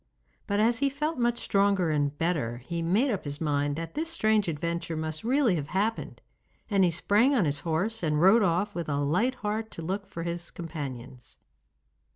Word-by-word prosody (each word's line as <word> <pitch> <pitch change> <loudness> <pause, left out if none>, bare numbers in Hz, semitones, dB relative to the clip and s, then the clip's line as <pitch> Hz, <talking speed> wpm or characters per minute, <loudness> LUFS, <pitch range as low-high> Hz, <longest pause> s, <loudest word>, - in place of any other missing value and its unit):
But 200 0 0
as 230 +2 +3
he 280 - +2
felt 300 +1 -3
much 240 0 +1
stronger 195 -6 +2
and 145 -1 0
better 150 -9 -1
he 170 -1 -3
made 205 +11 +2
up 200 - -2
his 145 0 -5
mind 145 -2 0
that 165 +1 -6
this 325 +2 -2
strange 215 - +2
adventure 170 +1 -3
must 155 0 -3
really 250 -2 +3
have 145 -2 -4
happened, 205 +7 -2 0.5
and 195 -2 +4
he 180 - +4
sprang 210 - +3
on 215 -9 +3
his 145 -1 0
horse 195 +8 -1
and 150 -2 +1
rode 195 +7 +6
off 195 +2 +1
with 170 -4 -4
a 140 - 0
light 180 - +1
heart 220 +1 -2
to 165 - -7
look 195 +4 -3
for 170 -4 -6
his 170 0 -4
companions. 135 -7 -8
175 Hz, 190 wpm, -28 LUFS, 155-220 Hz, 0.5 s, rode